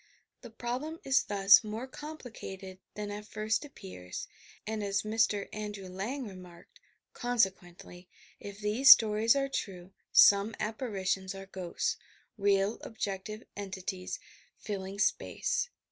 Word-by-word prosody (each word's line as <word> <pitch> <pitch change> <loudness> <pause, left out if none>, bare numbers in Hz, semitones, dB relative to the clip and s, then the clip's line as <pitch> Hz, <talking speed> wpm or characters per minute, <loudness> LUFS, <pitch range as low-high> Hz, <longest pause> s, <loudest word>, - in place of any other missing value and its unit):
The 240 - -10
problem 250 +8 -4
is 270 0 +4
thus 200 0 +6
more 220 +3 -4
com 300 +4 -8
plicated 190 -7 -9 0.2
than 210 -1 -4
at 210 +1 -7
first 215 +4 -1
appears, 190 - -8 0.4
and, 215 -1 -3
as 200 0 0
Mr. 215 -2 +1
Andrew 210 -2 -5
Lang 220 +8 -4
remarked, 180 -3 -13 0.3
"Consequently, 190 -6 -2 0.3
if 200 0 -8
these 220 +6 +3
stories 220 +1 +8
are 275 0 +1
true, 190 -7 -5 0.2
some 200 +2 +6
apparitions 195 -4 -2
are 195 0 -8
ghosts, 185 -3 -3 0.2
— - - -38
real 200 +1 +2
objective 215 0 -5
entities 190 -2 -5 0.4
filling 195 -1 -5
space. - - 0
205 Hz, 125 wpm, -31 LUFS, 190-225 Hz, 0.4 s, stories